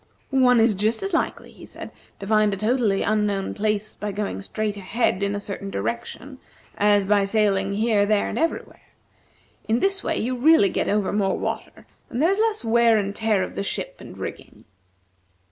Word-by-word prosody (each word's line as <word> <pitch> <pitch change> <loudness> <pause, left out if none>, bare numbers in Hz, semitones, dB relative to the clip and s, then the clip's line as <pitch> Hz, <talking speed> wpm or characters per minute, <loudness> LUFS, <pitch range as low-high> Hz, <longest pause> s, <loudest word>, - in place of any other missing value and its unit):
"One 255 -3 +4
is 225 0 +4
just 215 - -1
as 390 -1 -3
likely," 330 - -2
he - - -15
said, - - -9 0.3
"to 195 - -7
find 215 0 +3
a 195 - -3
totally 215 -1 +1
unknown 205 -2 0
place 215 0 -1
by 210 0 -5
going 200 - -3
straight 215 - -3
ahead 200 0 -1
in 200 0 0
a - - -2
certain 200 -1 -6
direction, 120 - -5 0.4
as 205 -1 +3
by 200 0 +3
sailing 200 -1 +1
here, 210 -1 +2
there, 210 -1 +2
and - - -3
everywhere. 330 +1 -2 0.9
In 225 +2 +2
this 390 +3 0
way, - - -1
you 255 +3 -1
really 255 -5 +5
get - - -1
over 205 -2 0
more 200 -2 +1
water, - - -5 0.2
and 240 - -4
there 330 +6 +4
is 395 - 0
less 440 - 0
wear 230 0 +4
and 200 -1 -2
tear 215 -4 +1
of - - -6
the - - -3
ship 200 - -4
and - - -11
rigging." - - -8
210 Hz, 190 wpm, -23 LUFS, 200-235 Hz, 0.9 s, really